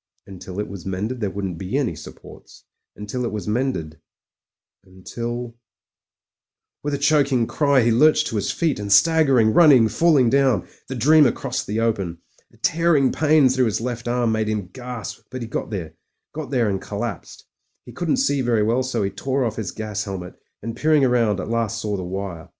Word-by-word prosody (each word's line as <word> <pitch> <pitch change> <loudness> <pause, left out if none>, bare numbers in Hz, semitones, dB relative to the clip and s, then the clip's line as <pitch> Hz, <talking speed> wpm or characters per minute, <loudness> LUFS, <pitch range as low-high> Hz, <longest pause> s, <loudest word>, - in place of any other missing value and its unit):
Until 95 0 -9
it 105 - -2
was 95 -3 -9
mended 105 +7 -3
there 105 -3 -1
wouldn't 95 -3 -5
be 95 +8 -2
any 140 -5 -1
supports - - -13 0.2
— - - -61
until 105 +5 -5
it 120 - -2
was 105 -1 -5
mended 105 - -2 0.4
— - - -66
^until 120 +6 -6 1.3
With 145 0 -2
a - - -2
chc4cing 140 -4 +2
cry 140 -3 +2
he 120 - +3
lurched 150 +7 +4
to 110 - -3
his 100 0 -1
feet: 160 -9 -1
and 100 -1 -4
staggering, 130 -1 +4
running, 140 -9 +6
falling 135 -1 +3
down, 135 -8 +2 0.2
the 135 - -5
dreamer 145 +2 +5
crossed - - -4
the 110 +2 -1
open. 100 -7 -1 0.3
A - - -23
tearing 160 -5 +2
pain 155 -2 +4
through 130 0 +2
his 110 -2 -1
left 120 0 -4
arm 120 -1 +1
made 110 -1 0
him 105 -4 -3
gasp, 125 -3 -7
but 130 -1 -6
he - - -6
got - - -4
there 95 -7 -5 0.2
— - - -58
got 155 -1 -6
there 125 -5 +1
and 95 -2 -2
collapsed. 105 -1 -6 0.4
He - - -11
couldn't 175 +6 -1
see 145 - +1
very 120 -4 +1
well, 115 +4 +1
so 130 -4 -2
he 100 - -1
tore 135 -1 -1
off 110 -2 -3
his 110 -5 -3
gas 105 -1 -4
helmet, 95 -3 -6 0.3
and, 115 +1 -5
peering 150 +2 +3
round, 115 -6 +2
at - - -5
last 115 -1 -1
saw 105 -2 -2
the 95 - -4
wire. 90 -2 -6
115 Hz, 195 wpm, -22 LUFS, 100-135 Hz, 1.3 s, running